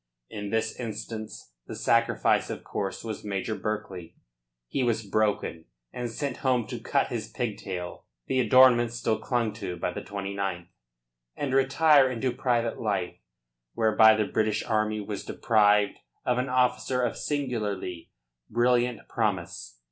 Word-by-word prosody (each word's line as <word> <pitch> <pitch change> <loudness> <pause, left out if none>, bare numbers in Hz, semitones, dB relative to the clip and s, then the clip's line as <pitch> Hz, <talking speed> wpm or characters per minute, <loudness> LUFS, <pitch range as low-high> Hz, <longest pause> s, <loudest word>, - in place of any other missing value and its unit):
In 105 -1 -5
this 110 +1 -1
instance 110 - -6 0.2
the - - -6
sacrifice, - - +2
of - - -5
course, 95 -1 -4
was 110 -2 -5
Major 100 +1 -2
Berkeley. 105 -4 -5 0.5
He 135 - -2
was 115 -3 0
broken 100 -5 0 0.3
and 120 -1 -3
sent 135 +2 -3
home 125 -3 +1
to 120 - -4
cut 140 +5 0
his 115 -3 -3
pigtail 95 -7 -5 0.2
(the 130 - 0
adornment 125 -2 +6
still 115 -2 0
clung 120 -4 -1
to 90 -3 -5
by 90 - -2
the - - -5
29th) 100 -3 -4 0.7
and 140 -2 -2
retire 135 +1 +5
into 130 +1 -1
private 120 -2 0
life, 100 -5 -1 0.6
whereby 110 0 +6
the 110 -1 +1
British 110 0 0
army 110 -1 0
was 105 -1 -5
deprived 105 -2 +3 0.3
of 125 0 +1
an 130 +1 -1
officer 125 0 +1
of 120 - 0
singularly 105 - -3 0.4
brilliant 120 -1 +1
promise. 95 - -2
110 Hz, 140 wpm, -27 LUFS, 105-125 Hz, 0.7 s, adornment